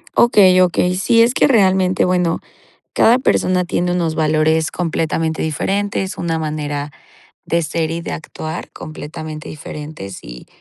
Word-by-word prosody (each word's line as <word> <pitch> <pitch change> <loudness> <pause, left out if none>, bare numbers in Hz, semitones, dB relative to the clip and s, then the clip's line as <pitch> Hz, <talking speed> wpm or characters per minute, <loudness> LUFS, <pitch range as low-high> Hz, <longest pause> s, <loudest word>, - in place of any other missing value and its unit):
Okey, 190 -6 +5
okey. 180 0 +2
Sí, 230 +5 +3
es 235 +2 +4
que, - - +3
realmente, 190 -6 +3
bueno, 180 -2 +1 0.5
cada 240 +3 +4
persona 180 -7 +1
tiene 175 0 -1
unos 170 -3 -1
valores 155 0 +2
completamente 160 -2 -1
diferentes, 195 +4 -2
una 165 -1 -1
manera 150 -2 -3 0.5
de 170 - +1
ser 160 0 -2
y 165 +1 -3
de - - -6
actuar, 160 0 -7
completamente 155 0 -8
diferentes, 150 -10 -8
y, - - -11
165 Hz, 135 wpm, -18 LUFS, 155-185 Hz, 0.5 s, Okey